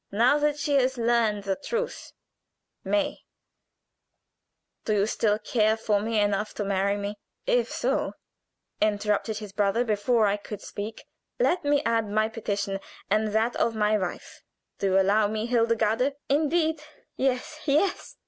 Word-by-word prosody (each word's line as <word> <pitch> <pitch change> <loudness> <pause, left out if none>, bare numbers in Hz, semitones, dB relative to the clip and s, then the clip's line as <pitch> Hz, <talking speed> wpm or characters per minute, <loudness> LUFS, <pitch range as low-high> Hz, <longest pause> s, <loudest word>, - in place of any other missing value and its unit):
Now 235 +8 +4
that 295 0 +1
she 290 0 -1
has 260 0 +1
learned 230 -3 +1
the 195 -1 -1
truth 475 +9 -4 0.7
May, 300 -1 0 1.6
do 215 - 0
you 200 0 +3
still 210 -1 +1
care 220 0 +1
for 215 -2 +1
me 220 0 0
enough 205 +1 0
to 205 - -2
marry 200 +1 +1
me?" 205 0 -5 0.3
"If - - +1
so," - - -1 0.7
interrupted 210 +1 +1
his 210 -2 -8
brother 205 +3 +2
before 220 +1 +2
I 200 0 +2
could 205 0 -8
speak, 210 +2 -7 0.3
"let 365 -7 +2
me 290 0 +2
add 230 -2 +1
my 215 +1 +1
petition 200 -3 -3 0.3
and 215 +1 +3
that 220 +3 +1
of 230 - +1
my 210 0 +2
wife 185 -4 -4 0.4
do 200 - +1
you 190 0 +4
allow 205 +2 +3
me, 215 +1 -2
Hildegarde?" 230 +2 +1
"Indeed, 315 +2 +1 0.3
yes, 265 +3 -1
yes!" 315 +6 +1
220 Hz, 150 wpm, -26 LUFS, 205-260 Hz, 1.6 s, Now